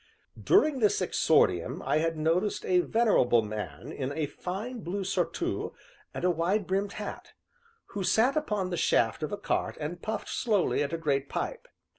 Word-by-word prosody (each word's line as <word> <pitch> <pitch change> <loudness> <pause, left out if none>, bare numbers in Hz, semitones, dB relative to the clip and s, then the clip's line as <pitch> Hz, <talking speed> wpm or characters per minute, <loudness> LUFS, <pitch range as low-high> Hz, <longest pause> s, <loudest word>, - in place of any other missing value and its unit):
During 310 -8 +4
this 210 -3 +3
exordium 145 - +2
I 140 +3 +2
had 165 0 0
noticed 170 +7 0
a 180 -1 +3
venerable 180 - +3
man 110 +6 -6
in 135 -3 -3
a 155 +1 -1
fine 195 - -5
blue 195 +1 -3
surtout 190 - -2 0.4
and - - -6
a 180 - +4
wide 180 +5 0
brimmed 195 +2 -1
hat, 210 -1 -7 0.6
who 200 - -4
sat 235 +8 +3
upon 210 -12 -1
the 175 - -1
shaft 115 -1 +2
of 155 - -3
a 205 - -2
cart 200 - -2
and 160 +3 -5
puffed 215 -1 -4
slowly 210 - +1
at 145 0 -1
a 165 - -1
great 140 -4 -1
pipe. - - -4
180 Hz, 170 wpm, -29 LUFS, 155-210 Hz, 0.6 s, During